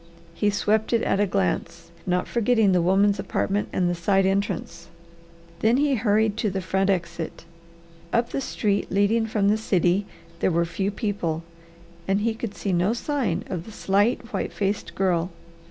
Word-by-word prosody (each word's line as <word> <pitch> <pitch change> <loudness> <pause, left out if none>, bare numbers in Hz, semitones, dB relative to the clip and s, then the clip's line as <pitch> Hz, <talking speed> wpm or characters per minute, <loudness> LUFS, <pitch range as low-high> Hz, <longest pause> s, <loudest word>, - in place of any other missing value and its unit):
He 205 +4 +1
swept 215 +2 +1
it 230 - +2
at 195 - +1
a 205 - +3
glance, 170 - -2 0.2
not 180 0 0
forgetting 225 -3 +3
the 180 -1 +3
women's 195 +3 +3
apartment 205 +1 -1
and 180 - +1
the 175 - +1
side 190 +3 +2
entrance. 190 -3 -2 0.7
Then 225 +3 +3
he 285 0 +2
hurried 215 -2 +2
to 220 -1 0
the 190 0 -2
front 190 +1 0
exit. 170 -3 -2 0.7
Up 235 +1 +1
the 275 - -2
street 205 -5 -1
leading 210 +3 +2
from 210 -2 +1
the 215 - +3
city 190 -2 +1 0.3
there - - +2
were 170 -1 +2
few 185 +4 -2
people 195 -7 -2 0.6
and 195 +1 +1
he 225 +1 +1
could 220 -2 -6
see 195 - -2
no 180 +5 +2
sign 240 - -1
of 175 -2 -4
the 220 - -10
slight, 210 +5 0
white - - -2
faced 205 +1 -2
girl. 180 -2 +1
200 Hz, 170 wpm, -24 LUFS, 180-220 Hz, 0.7 s, a